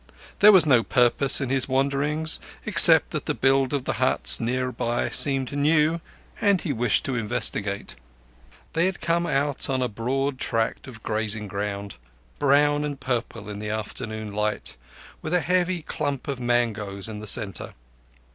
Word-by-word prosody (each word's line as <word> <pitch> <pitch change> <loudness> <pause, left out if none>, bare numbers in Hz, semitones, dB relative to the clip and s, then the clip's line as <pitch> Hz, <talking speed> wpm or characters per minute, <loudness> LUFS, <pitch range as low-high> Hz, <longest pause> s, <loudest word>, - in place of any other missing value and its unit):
There 210 +1 +7
was 190 -5 +5
no 130 -6 +4
purpose 125 +3 +2
in 130 - -3
his 135 0 +1
wanderings, 140 +4 +1 0.3
except - - +8
that - - -5
the - - -1
build 135 0 +1
of 140 -3 -2
the - - -2
huts - - +4
near 125 +2 -2
by 120 -1 -3
seemed 135 -3 +2
new, 155 +3 +1 0.4
and 200 -2 +2
he 155 -5 -4
wished 120 0 0
to 135 - -2
investigate. 105 -2 -3 0.8
They 170 +4 +1
came 170 0 -2
out 140 -2 -2
on 130 -1 -1
a - - -1
broad 130 +4 -3
tract 115 +2 -3
of 115 -4 -12
grazing 110 -1 -1
ground, 100 0 -6 0.4
brown 145 +1 +2
and 145 -2 -5
purple 120 -5 -4
in 105 -1 -7
the 105 0 -6
afternoon 110 0 -6
light, 105 +1 -3 0.5
with 160 +3 -3
a - - +3
heavy 180 -1 -1
clump 145 -4 -4
of 140 -3 -4
mangoes 110 -5 -2
in 110 -1 -8
the 110 - -8
centre. 100 -2 -2
130 Hz, 160 wpm, -23 LUFS, 110-145 Hz, 0.8 s, except